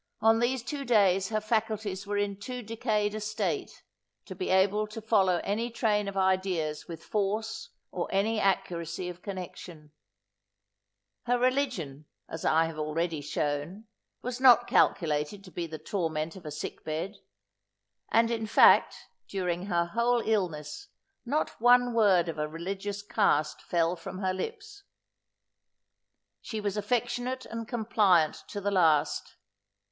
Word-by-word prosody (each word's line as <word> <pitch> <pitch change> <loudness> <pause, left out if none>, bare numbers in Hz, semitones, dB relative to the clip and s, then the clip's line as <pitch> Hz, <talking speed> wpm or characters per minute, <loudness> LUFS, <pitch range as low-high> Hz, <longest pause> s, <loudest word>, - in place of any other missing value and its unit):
On 225 +1 +4
these 240 +1 0
two 285 +2 -4
days 195 -6 +3
her 215 -1 0
faculties 215 -3 -2
were 205 0 -1
in 205 -1 0
too 250 +3 -6
decayed 215 -2 -1
a 215 - -3
state, 215 0 -3 0.4
to 190 - -7
be 185 0 -4
able 200 +3 +3
to 215 +2 -7
follow 195 -5 +2
any 225 +4 -1
train 210 -3 0
of 200 0 -5
ideas 185 -5 0
with 165 -1 -8
force 215 +2 -2 0.2
or 175 - -3
any 215 +3 +1
accuracy 180 -3 -1
of 180 0 -9
connection. 175 -5 -8 1.4
Her 245 +1 +3
religion, 245 - -1 0.2
as 160 - -7
I 160 +1 +3
have 160 -1 -6
already 155 +1 -1
shown, 150 +7 -3 0.4
was 250 +1 -4
not 250 -3 +7
calculated 155 +3 +1
to 185 - -13
be 170 -1 -4
the 155 -1 -7
torment 160 -3 -3
of 175 -5 -10
a - - -5
sick 150 - -6
bed; 165 +6 -4 0.9
and, 230 +1 +4
in 225 -1 -2
fact, 220 - +6 0.3
during 180 -1 -2
her 170 -3 +1
whole 235 +6 +1
illness, 185 - -2 0.4
not 290 -3 -1
one 245 0 +5
word 195 -6 +4
of 160 -2 -4
a 150 - 0
religious 195 +5 -5
cast 195 -8 +1
fell 170 0 0
from 180 - -8
her 190 -1 -1
lips. 410 - -6 1.6
She 220 - -5
was 205 -1 -2
affectionate 245 +4 -1
and 230 -1 -6
compliant 210 -9 +2
to 205 - -5
the 205 0 -1
last. 160 -6 +2
200 Hz, 145 wpm, -29 LUFS, 170-225 Hz, 1.6 s, not